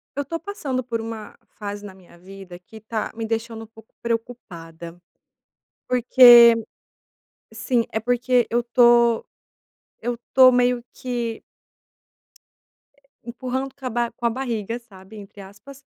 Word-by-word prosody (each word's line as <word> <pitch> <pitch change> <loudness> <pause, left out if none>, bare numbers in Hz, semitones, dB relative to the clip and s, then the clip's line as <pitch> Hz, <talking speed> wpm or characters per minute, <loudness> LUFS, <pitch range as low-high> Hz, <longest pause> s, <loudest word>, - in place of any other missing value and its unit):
Eu 285 - -2
estou 330 +4 -5
passando 285 -11 -4
por 230 -1 -4
uma 225 -1 -8 0.2
fase 205 0 -7
na 200 - -10
minha 185 -2 -20
vida 185 0 -12
que 220 +5 -16
está 220 0 -5
me 225 - -4
deixando 225 0 -4
um - - -13
pouco 225 0 -19
preocupada, 175 -8 -6 0.9
porque 240 -1 +7 1.0
Sim, 245 -4 -1
é 220 - -1
porque 245 +1 +1
eu 240 - +1
estou 235 -1 +3 0.8
eu 245 +2 -2
estou 255 +2 +4
meio 245 -1 +1
que 240 -3 -5 1.8
"empurrando 255 +2 -5
com 270 - -12
a - - -1
ba 240 0 -2
com 235 +1 -8
a - - +4
barriga", 230 -2 -4
sabe, 205 -2 -16
entre 200 0 -12
aspas, 210 +9 -14
235 Hz, 135 wpm, -22 LUFS, 215-245 Hz, 1.8 s, porque